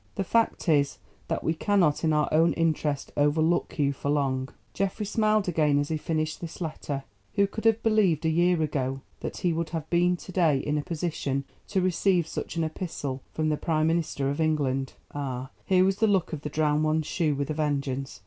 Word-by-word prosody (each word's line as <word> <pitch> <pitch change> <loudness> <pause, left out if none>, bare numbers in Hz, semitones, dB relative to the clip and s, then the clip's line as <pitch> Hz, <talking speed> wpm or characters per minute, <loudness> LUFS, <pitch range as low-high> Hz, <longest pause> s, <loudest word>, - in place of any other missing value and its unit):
The 195 - -1
fact 230 +1 +1
is, 145 -3 +3 0.3
that - - -2
we 160 - +1
cannot 175 -3 +2
in 160 - +3
our 150 -1 +2
own 165 +2 +4
interest 155 -3 0
overlook 155 +5 +2
you 140 -2 +2
for 140 - -4
long." 135 -2 0 0.2
Geoffrey 195 +2 -1
smiled 215 -1 +2
again 155 -4 +2
as 145 0 0
he 160 - 0
finished 155 0 -2
this 170 -2 -7
letter. 150 -4 -4 0.3
Who 200 - +4
could 220 +3 -6
have 225 0 +3
believed 200 -8 +3
a - - +3
year 175 +2 +3
ago 135 -3 -2 0.2
that - - -5
he 175 -2 +1
would 165 0 -2
have 160 -2 -4
been 175 +1 +3
to 185 - -10
day 165 -6 +3
in 150 +2 -1
a - - -1
position 150 -4 -2 0.2
to 190 - 0
receive 180 -1 +2
such 160 - -5
an 165 - 0
epistle 155 -5 -4
from 155 0 0
the 150 - +1
Prime 155 -1 +1
Minister 160 -4 0
of 145 +3 -2
England? 135 -4 0 0.2
Ah, 130 -3 -4 0.2
here 185 -1 +5
was 195 0 +1
the 220 - +3
luck 190 -5 +1
of 150 - -4
the 150 - -4
Drowned 150 0 +1
One's 155 0 +1
shoe 155 -3 0
with 140 +2 -2
a - - 0
vengeance. 140 -7 -2
155 Hz, 205 wpm, -27 LUFS, 145-175 Hz, 0.3 s, here